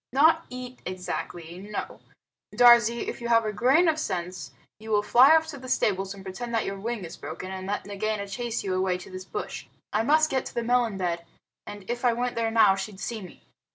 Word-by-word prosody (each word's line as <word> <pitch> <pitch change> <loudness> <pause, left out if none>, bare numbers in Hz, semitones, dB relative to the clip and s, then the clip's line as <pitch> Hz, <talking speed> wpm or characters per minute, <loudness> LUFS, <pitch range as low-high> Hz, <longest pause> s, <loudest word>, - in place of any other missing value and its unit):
"Not 320 +5 +4
eat 250 0 -8
exactly; 175 -2 -5
no. 205 +2 -6 0.6
Darzee, 235 -1 +6
if - - -5
you 235 - -3
have 230 -1 +4
a 215 - -2
grain 270 - +4
of 315 -1 +2
sense 180 - -4 0.3
you 220 +1 -10
will 210 -1 +2
fly 260 +8 +7
off 320 0 +3
to 285 -3 -7
the 255 0 -9
stables 195 -4 0
and 195 - -11
pretend 230 +5 -5
that 225 - +1
your 195 0 -4
wing 225 -2 -4
is 165 - -8
broken, 165 +5 -7
and 190 0 -6
let 205 +1 -2
Nagaina 205 0 -3
chase 235 +3 -3
you 190 - -2
away 185 -1 +1
to 180 - -12
this 185 0 -7
bush. - - -6 0.3
I 215 - +2
must 310 +6 +3
get 265 -1 +1
to - - -11
the 235 - -1
melon 240 -3 +1
bed, 170 -2 -2 0.4
and 205 -2 -9
if 240 +1 -3
I 245 -2 +4
went 245 +1 -1
there 230 -1 0
now 220 -4 +5
she'd 195 0 -6
see 225 0 -4
me." 180 -3 -12
215 Hz, 225 wpm, -26 LUFS, 190-245 Hz, 0.6 s, fly